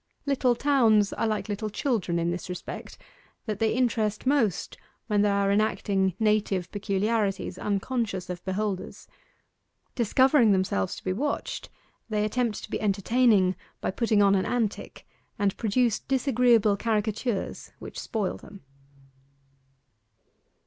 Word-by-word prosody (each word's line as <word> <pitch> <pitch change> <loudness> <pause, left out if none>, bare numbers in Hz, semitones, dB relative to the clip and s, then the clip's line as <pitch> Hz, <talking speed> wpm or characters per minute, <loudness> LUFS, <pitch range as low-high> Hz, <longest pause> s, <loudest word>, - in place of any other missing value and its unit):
Little 265 -3 +2
towns 230 -7 +3
are 225 - -1
like 215 0 -2
little 215 +1 -3
children 210 - -1
in 170 0 0
this 180 +1 -5
respect, 180 - -7 0.5
that 215 -3 -3
they 225 -1 +2
interest 225 -4 0
most 240 - +1 0.3
when 210 -3 +1
they 205 - +3
are 200 0 +2
enacting 200 -3 +1
native 210 -5 +1
peculiarities 200 -1 -1
unconscious 205 -2 -2
of 180 -1 -6
beholders. 195 0 -3 0.9
Discovering 250 0 +4
themselves 185 - 0
to - - -11
be 185 - -1
watched 285 +9 -3 0.4
they 210 -1 0
attempt 230 0 -1
to - - -9
be - - -2
entertaining 205 -1 +3 0.2
by - - -2
putting 215 -1 +2
on 200 0 +5
an 190 -1 +1
antic, 230 -4 -3 0.3
and 200 -1 +1
produce 230 0 +1
disagreeable 245 -6 +2
caricatures 215 0 -2
which - - -8
spoil 210 -4 -2
them. 200 -5 -14
210 Hz, 130 wpm, -27 LUFS, 195-235 Hz, 0.9 s, on